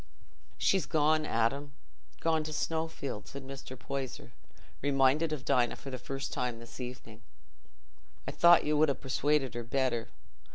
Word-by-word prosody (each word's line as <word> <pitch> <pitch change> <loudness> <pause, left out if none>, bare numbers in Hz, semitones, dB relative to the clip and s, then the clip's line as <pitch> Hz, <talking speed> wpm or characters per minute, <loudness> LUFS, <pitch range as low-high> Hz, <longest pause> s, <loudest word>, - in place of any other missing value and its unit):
"She's 190 -3 +2
gone, 155 0 +2
Adam—gone 145 +6 -2
to 155 - -4
Snowfield," 160 -7 -3
said 140 -1 -8
Mr. 135 -1 -8
Poyser, 130 -2 -5 0.5
reminded 140 +3 +3
of 145 -4 -4
Dinah 120 -1 +3
for 135 - -9
the 130 - -5
first 135 +2 -4
time 125 -2 -1
this 115 +2 -11
evening. 120 -3 -8 1.1
"I - - -1
thought 170 0 +7
you'd 150 0 +3
ha' 140 - -1
persuaded 135 0 +1
her 120 - -3
better. 120 -2 0
135 Hz, 135 wpm, -31 LUFS, 125-150 Hz, 1.1 s, thought